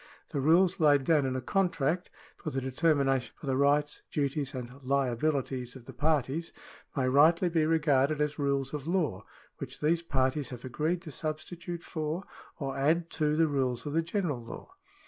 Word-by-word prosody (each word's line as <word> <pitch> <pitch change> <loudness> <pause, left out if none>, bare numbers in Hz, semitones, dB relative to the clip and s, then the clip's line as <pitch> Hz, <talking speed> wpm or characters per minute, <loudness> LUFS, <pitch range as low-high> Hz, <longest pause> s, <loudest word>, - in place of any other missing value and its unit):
The 140 - -2
rules 175 +6 +4
laid 145 -3 +5
down 145 -2 +3
in 130 - -2
a 130 - -2
contract, 175 +1 0 0.3
for - - -5
the 135 - -2
determination 135 -1 +1
of - - -9
the 135 - +1
rights, 145 +2 +2
duties, 140 -1 -1
and 125 +2 -7
liabilities 130 -1 -1
of 125 -3 -12
the 135 - -10
parties, 150 +3 0 0.5
may 130 -2 +2
rightly 160 +7 +5
be 160 -2 +2
regarded 150 -2 +2
as 150 0 -1
rules 140 -1 0
of 150 0 -5
law 155 - 0 0.3
which - - -7
these 165 +3 +2
parties 135 -3 0
have 125 -1 -8
agreed 155 +7 -1
to 160 - -8
substitute 165 +3 -5
for. 155 +3 -3 0.3
or 135 -4 -3
add 165 +5 +1
to 150 -1 +1
the 165 +1 +4
rules 130 -4 -1
of 145 - -3
the 165 - +3
general 165 - -2
law. 115 - -9
145 Hz, 175 wpm, -30 LUFS, 135-160 Hz, 0.5 s, laid